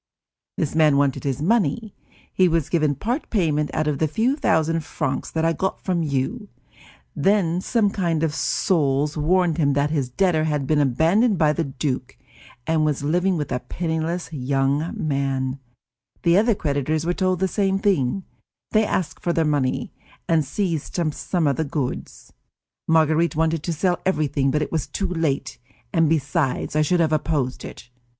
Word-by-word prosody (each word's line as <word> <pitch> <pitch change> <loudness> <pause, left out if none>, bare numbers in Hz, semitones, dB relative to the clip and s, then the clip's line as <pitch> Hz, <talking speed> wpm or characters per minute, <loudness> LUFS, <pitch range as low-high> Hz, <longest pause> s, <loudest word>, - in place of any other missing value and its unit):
This 150 - -1
man 155 -3 +4
wanted 140 -2 +1
his 140 +1 -1
money; 215 +1 +1 0.4
he 185 - +4
was 165 -3 0
given 155 -4 +1
part 240 - -3
payment 155 -8 +1
out 155 -1 -1
of 150 -2 -1
the 160 - +2
few 225 - +1
thousand 165 - +1
francs 145 -3 -3
that 160 0 -1
I 165 - +2
got 190 +5 -2
from 180 -2 -1
you; 155 - -2 0.7
then 185 -4 +2
some 210 -1 +1
kind 170 -6 -1
souls 150 -5 +1
warned 170 +1 +1
him 145 -3 +3
that 145 +1 +1
his 140 -5 -1
debtor 160 +1 +1
had 150 -3 -1
been 150 +2 +2
abandoned 165 - +3
by 155 -2 +3
the 165 +1 -1
duke 130 -2 -4 0.5
and 160 +1 +1
was 150 -2 0
living 180 +5 +1
with 150 -3 -4
a 125 - 0
penniless 165 +2 -3
young 140 +3 0
man; 135 -2 -1 0.6
the 170 0 +4
other 220 +3 +4
creditors 150 0 -1
were 175 - +1
told 185 0 0
the 190 - +2
same; 195 0 0 0.9
they 215 0 +4
asked 185 -5 -2
for 170 - 0
their 165 -1 +1
money, 145 -4 -1 0.3
and 165 -2 +3
seized 165 +2 -3 0.2
some 175 +1 -1
of 140 -3 +1
the 160 - +1
goods. 140 -3 -5 0.5
Marguerite 160 +1 +3
wanted 160 0 +1
to 170 - -3
sell 175 +3 0
everything, 150 -6 +1
but 150 +2 +1
it - - -6
was 160 -3 -1
too 195 - -3
late, 165 -6 -2 0.3
and 165 -3 +3
besides 145 -2 0
I 155 - +3
should 170 +3 +2
have 160 -1 +2
opposed 145 -4 -1
it. 125 - -10
160 Hz, 170 wpm, -23 LUFS, 145-175 Hz, 0.9 s, man